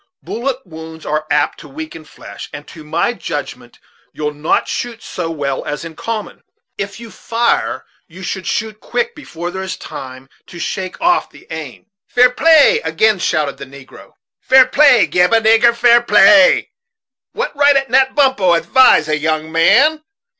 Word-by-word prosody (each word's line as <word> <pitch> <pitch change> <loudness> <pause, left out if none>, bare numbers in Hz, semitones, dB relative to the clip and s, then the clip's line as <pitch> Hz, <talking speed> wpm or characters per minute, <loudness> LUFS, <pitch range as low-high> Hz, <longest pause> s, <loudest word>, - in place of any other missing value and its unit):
Bullet 260 +3 -4
wounds 160 -1 -11
are 155 +1 -2
apt 145 0 0
to - - -12
weaken 155 +2 -9
flesh, 150 - -11
and 145 0 -10
to 160 - -12
my 170 +10 -1
judgment 145 - -7 0.3
you'll 150 -1 -4
not 150 +2 -1
shoot 235 -2 -5
so 170 -2 -5
well 140 -4 -3
as 150 +3 -5
in 160 -1 -10
common. 220 +2 -6 0.3
If 200 +1 -6
you 235 -1 -10
will - - -16
fire, 235 +1 -2 0.2
you 185 +2 -13
should 190 +1 -5
shoot 215 -1 -3
quick, 475 - -3
before 175 - -8
there 190 +1 -6
is 190 0 -5
time 130 0 -10 0.2
to 175 - -12
shake 185 +1 -5
off 350 +2 +1
the - - -18
aim." 155 -5 -8 0.2
"Fair 250 0 +3
play," 325 - +4
again 215 -3 +1
shouted 150 -4 -1
the 140 - -9
negro; 135 0 -15 0.3
"fair 260 0 +5
play 265 -3 +4
gib 180 +3 +1
a 225 - +5
nigger 225 +1 +4
fair 240 0 +4
play. 290 +4 +5 0.6
What 475 -8 -4
right 285 0 +4
a - - -20
Nat 265 +1 +2
Bumppo 260 -12 +3
advise 170 0 +4
a 155 -1 -1
young 155 +1 -2
man? 295 - +3
190 Hz, 170 wpm, -16 LUFS, 155-250 Hz, 0.6 s, fair